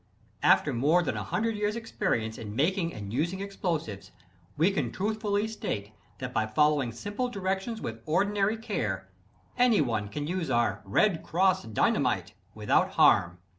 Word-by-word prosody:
After -, -, +4 dB
more 155 Hz, +9 st, +3 dB
than -, -, -2 dB
a -, -, -3 dB
hundred 220 Hz, +6 st, -1 dB
years' 210 Hz, +1 st, -1 dB
experience 115 Hz, -, -2 dB
in 105 Hz, -2 st, -7 dB
making 170 Hz, -, +1 dB
and 100 Hz, -4 st, -7 dB
using 170 Hz, +8 st, -1 dB
explosives, 170 Hz, -, -3 dB, 0.5 s
we 165 Hz, +6 st, +4 dB
can 135 Hz, -10 st, -1 dB
truthfully 210 Hz, -, -1 dB
state 105 Hz, -, -4 dB, 0.3 s
that 125 Hz, -1 st, -6 dB
by 110 Hz, 0 st, +1 dB
following 145 Hz, +1 st, +2 dB
simple 205 Hz, -, -3 dB
directions 195 Hz, +2 st, -3 dB
with 115 Hz, 0 st, -5 dB
ordinary 200 Hz, +5 st, +1 dB
care, 105 Hz, -, -3 dB, 0.5 s
anyone 145 Hz, -, +2 dB
can 145 Hz, +8 st, -4 dB
use 175 Hz, +1 st, -2 dB
our 115 Hz, -4 st, +1 dB
"Red 160 Hz, -, +2 dB
Cross" 185 Hz, +2 st, +1 dB
Dynamite 110 Hz, -2 st, +1 dB, 0.2 s
without -, -, +1 dB
harm. 85 Hz, 0 st, +4 dB
165 Hz, 145 wpm, -28 LUFS, -, 0.5 s, After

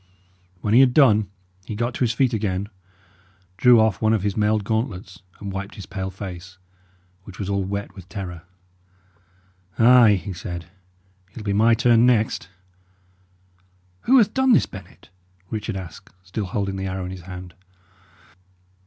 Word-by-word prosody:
When 105 Hz, -, 0 dB
he 120 Hz, -, +7 dB
had 130 Hz, -2 st, +5 dB
done, 110 Hz, -9 st, +5 dB, 0.3 s
he 105 Hz, -, -6 dB
got 120 Hz, +3 st, -2 dB
to -, -, -7 dB
his 120 Hz, -3 st, +2 dB
feet 125 Hz, +1 st, +1 dB
again, 100 Hz, -2 st, -2 dB, 0.9 s
drew 120 Hz, +2 st, +6 dB
off 110 Hz, -4 st, +1 dB
one 110 Hz, 0 st, +3 dB
of 105 Hz, -4 st, 0 dB
his 100 Hz, -2 st, -1 dB
mailed 105 Hz, 0 st, +1 dB
gauntlets, 105 Hz, -4 st, -3 dB, 0.2 s
and 100 Hz, -1 st, -6 dB
wiped 95 Hz, +1 st, -6 dB
his 100 Hz, -, -9 dB
pale 95 Hz, -1 st, -5 dB
face, 90 Hz, -1 st, -9 dB, 0.7 s
which 100 Hz, -1 st, -12 dB
was 100 Hz, -2 st, -4 dB
all 100 Hz, -1 st, 0 dB
wet 100 Hz, +2 st, -5 dB
with 95 Hz, -2 st, -13 dB
terror. 90 Hz, -5 st, -6 dB, 1.4 s
"Ay," 120 Hz, -2 st, +6 dB
he 95 Hz, +1 st, -5 dB
said, 85 Hz, 0 st, -7 dB, 0.7 s
"it'll 110 Hz, -, -8 dB
be 100 Hz, -1 st, -1 dB
my 115 Hz, +3 st, +4 dB
turn 120 Hz, 0 st, +4 dB
next." 110 Hz, -7 st, +1 dB, 1.6 s
"Who 265 Hz, +2 st, +5 dB
hath 215 Hz, -4 st, +4 dB
done 265 Hz, -1 st, +3 dB
this, -, -, +4 dB
Bennet?" 95 Hz, -1 st, -13 dB, 0.4 s
Richard 110 Hz, -1 st, -4 dB
asked, 95 Hz, 0 st, -10 dB
still 95 Hz, +3 st, -4 dB
holding 100 Hz, +1 st, -3 dB
the 95 Hz, 0 st, -3 dB
arrow 95 Hz, 0 st, -4 dB
in 90 Hz, -, -6 dB
his 95 Hz, -1 st, -8 dB
hand. 90 Hz, -1 st, -9 dB
100 Hz, 160 wpm, -22 LUFS, 95-115 Hz, 1.6 s, he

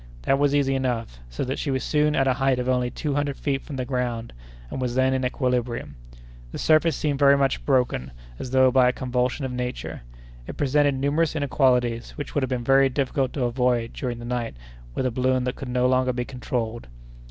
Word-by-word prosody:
That 135 Hz, -, +2 dB
was 145 Hz, 0 st, +3 dB
easy 135 Hz, -2 st, +2 dB
enough, 120 Hz, -, -2 dB
so -, -, -4 dB
that 135 Hz, +1 st, -3 dB
she 145 Hz, -, -2 dB
was 130 Hz, -2 st, -1 dB
soon 150 Hz, 0 st, +2 dB
at 135 Hz, -, +2 dB
a 130 Hz, -, +4 dB
height 135 Hz, 0 st, +1 dB
of 125 Hz, 0 st, -2 dB
only 125 Hz, -1 st, +1 dB
two 150 Hz, +3 st, -3 dB
hundred 145 Hz, -1 st, -1 dB
feet 135 Hz, -2 st, -1 dB
from 145 Hz, -, -8 dB
the 130 Hz, -1 st, -2 dB
ground, 120 Hz, -3 st, -3 dB, 0.4 s
and -, -, -4 dB
was 125 Hz, -1 st, -2 dB
then 130 Hz, 0 st, +3 dB
in 130 Hz, 0 st, 0 dB
equilibrium. 125 Hz, -, -1 dB, 0.6 s
The -, -, -6 dB
surface 160 Hz, +1 st, +3 dB
seemed 145 Hz, -2 st, -1 dB
very 140 Hz, -1 st, +6 dB
much 135 Hz, -1 st, 0 dB
broken 125 Hz, -, +1 dB, 0.3 s
as 130 Hz, -, -5 dB
though 130 Hz, 0 st, +4 dB
by 125 Hz, -1 st, +5 dB
a -, -, -1 dB
convulsion 125 Hz, +2 st, -1 dB
of 130 Hz, -, -3 dB
nature. 125 Hz, 0 st, -4 dB, 0.5 s
It -, -, -7 dB
presented 145 Hz, 0 st, +2 dB
numerous 145 Hz, +4 st, +1 dB
inequalities, 125 Hz, -5 st, +1 dB
which 145 Hz, -2 st, -6 dB
would 145 Hz, -, +1 dB
have 130 Hz, -, -1 dB
been 125 Hz, -2 st, -2 dB
very 135 Hz, +2 st, +4 dB
difficult 135 Hz, 0 st, -1 dB
to 135 Hz, -, -1 dB
avoid 120 Hz, -1 st, 0 dB
during 125 Hz, -3 st, -4 dB
the 120 Hz, -, -8 dB
night 120 Hz, -, -3 dB, 0.4 s
with -, -, -1 dB
a 130 Hz, -, +1 dB
balloon 130 Hz, +1 st, +1 dB
that 125 Hz, 0 st, -2 dB
could 135 Hz, -, -7 dB
no 125 Hz, 0 st, +1 dB
longer 130 Hz, 0 st, +2 dB
be 120 Hz, 0 st, -2 dB
controlled. 120 Hz, -3 st, -4 dB
130 Hz, 215 wpm, -24 LUFS, 125-135 Hz, 0.6 s, very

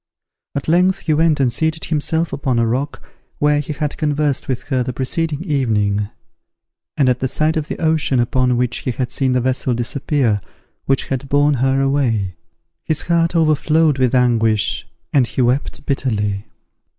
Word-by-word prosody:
At 140 Hz, -, -3 dB
length 180 Hz, +4 st, +3 dB
he 155 Hz, -, 0 dB
went 155 Hz, -1 st, +3 dB
and 125 Hz, -4 st, +2 dB
seated 160 Hz, 0 st, -1 dB
himself 160 Hz, +1 st, -1 dB
upon 130 Hz, -3 st, -1 dB
a 115 Hz, -, +3 dB
rock 130 Hz, +5 st, -2 dB, 0.3 s
where 150 Hz, 0 st, +2 dB
he 150 Hz, +1 st, -4 dB
had 150 Hz, 0 st, -3 dB
conversed 150 Hz, -2 st, 0 dB
with 130 Hz, -2 st, -2 dB
her 130 Hz, -3 st, +1 dB
the 125 Hz, 0 st, -3 dB
preceding 150 Hz, +5 st, -2 dB
evening; 105 Hz, -, 0 dB, 0.9 s
and 140 Hz, -3 st, +3 dB
at 125 Hz, -1 st, +2 dB
the 130 Hz, -, 0 dB
sight 155 Hz, +5 st, 0 dB
of 155 Hz, -2 st, -2 dB
the -, -, -4 dB
ocean 155 Hz, -5 st, +1 dB
upon 125 Hz, +1 st, +1 dB
which 125 Hz, -1 st, 0 dB
he -, -, -4 dB
had 125 Hz, +1 st, -2 dB
seen 130 Hz, -2 st, 0 dB
the 125 Hz, -, +2 dB
vessel 130 Hz, 0 st, 0 dB
disappear 120 Hz, -3 st, 0 dB, 0.4 s
which 135 Hz, -1 st, 0 dB
had 135 Hz, 0 st, -3 dB
borne 145 Hz, +1 st, +3 dB
her 135 Hz, +1 st, +1 dB
away, 125 Hz, -9 st, +1 dB, 0.5 s
his 155 Hz, -1 st, -1 dB
heart 170 Hz, 0 st, +1 dB
overflowed 155 Hz, -2 st, +3 dB
with 130 Hz, 0 st, +2 dB
anguish, 115 Hz, -4 st, +2 dB, 0.3 s
and 130 Hz, -4 st, +4 dB
he 130 Hz, -, -2 dB
wept 125 Hz, +4 st, -1 dB
bitterly. 105 Hz, -7 st, -1 dB
135 Hz, 170 wpm, -19 LUFS, 125-150 Hz, 0.9 s, and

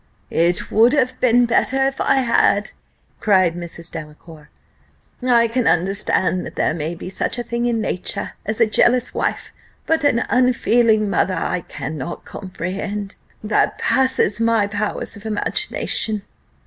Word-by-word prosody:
"It 170 Hz, +1 st, +1 dB
would 230 Hz, +4 st, +5 dB
have 260 Hz, -3 st, 0 dB
been 245 Hz, -1 st, +4 dB
better 265 Hz, +3 st, +2 dB
if 270 Hz, 0 st, -2 dB
I -, -, +3 dB
had," 230 Hz, -5 st, +2 dB, 0.5 s
cried 185 Hz, -5 st, +3 dB
Mrs. 170 Hz, -1 st, -7 dB
Delacour, 155 Hz, -1 st, -10 dB, 0.7 s
"I 240 Hz, -2 st, +3 dB
can 235 Hz, +1 st, -1 dB
understand 185 Hz, 0 st, +1 dB
that -, -, -9 dB
there -, -, +1 dB
may 160 Hz, +1 st, -4 dB
be 170 Hz, -, -9 dB
such 190 Hz, -, -3 dB
a 240 Hz, -, -3 dB
thing 235 Hz, +1 st, -2 dB
in 235 Hz, -2 st, 0 dB
nature 200 Hz, -1 st, -3 dB
as 215 Hz, +2 st, -3 dB
a 230 Hz, -, +6 dB
jealous 240 Hz, +3 st, +2 dB
wife, -, -, -2 dB, 0.3 s
but 320 Hz, -2 st, +1 dB
an 250 Hz, -5 st, +2 dB
unfeeling 235 Hz, -3 st, +3 dB
mother 185 Hz, -1 st, +1 dB
I -, -, -1 dB
cannot 155 Hz, +1 st, -6 dB
comprehend 195 Hz, +2 st, -5 dB, 0.3 s
that 210 Hz, 0 st, +1 dB
passes 260 Hz, -5 st, +1 dB
my 230 Hz, -2 st, +2 dB
powers 205 Hz, +2 st, -3 dB
of 205 Hz, -, -12 dB
imagination." 215 Hz, 0 st, -1 dB
215 Hz, 145 wpm, -20 LUFS, 185-240 Hz, 0.7 s, a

